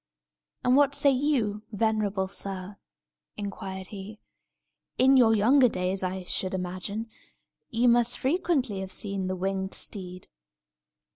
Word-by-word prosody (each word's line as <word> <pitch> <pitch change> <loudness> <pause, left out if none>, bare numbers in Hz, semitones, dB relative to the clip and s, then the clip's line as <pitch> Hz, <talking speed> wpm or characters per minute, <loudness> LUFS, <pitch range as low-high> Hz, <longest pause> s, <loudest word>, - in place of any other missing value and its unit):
"And 250 +1 +4
what 285 0 +4
say 280 - +5
you, 250 -7 0
venerable 210 -3 0
sir?" 195 0 -6 0.6
inquired 190 -2 -6
he, 205 +1 -9 0.8
"In 265 +1 +5
your 230 -4 +6
younger 250 +5 +5
days, 185 -1 -1
I 185 0 -3
should 185 +1 -1
imagine, 185 +4 -4 0.6
you 235 +2 +2
must 240 0 +3
frequently 275 - 0
have 190 0 -5
seen 195 -2 -3
the 185 - -2
winged 190 +1 -2
steed!" 185 -3 -4
205 Hz, 125 wpm, -27 LUFS, 190-240 Hz, 0.8 s, your